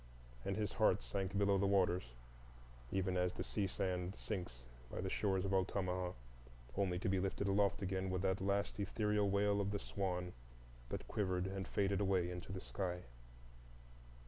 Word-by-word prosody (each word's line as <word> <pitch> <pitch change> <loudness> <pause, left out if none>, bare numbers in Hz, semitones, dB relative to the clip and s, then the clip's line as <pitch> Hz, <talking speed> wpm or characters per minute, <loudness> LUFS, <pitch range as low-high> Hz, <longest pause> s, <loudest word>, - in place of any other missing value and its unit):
And 100 - -1
his 105 -2 -1
heart - - +4
sank 95 +10 -2
below 100 -1 +4
the 100 - +3
waters, 90 -10 +2 0.8
even 95 -1 +1
as 90 0 +2
the - - -3
sea 100 -2 0
sand 90 0 -1
sinks 90 - -5 0.2
by - - -5
the 95 0 -2
shores 95 -2 +1
of 95 - 0
Altamaha, 95 -1 +1 0.6
only 90 -3 +1
to 90 - -2
be 95 0 +3
lifted 95 +1 0
aloft 100 0 +3
again 95 0 -1
with 95 0 -1
that 95 0 +1
last 100 +1 0
ethereal 105 0 +1
wail 100 +1 +3
of 100 - 0
the 100 - 0
swan 90 -3 -2 0.6
that - - -4
quivered 95 -3 0
and 95 0 -3
faded 100 0 +1
away 95 -3 +2
into 90 +1 -6
the 95 - -3
sky. 90 -3 -3
95 Hz, 170 wpm, -39 LUFS, 90-100 Hz, 0.8 s, heart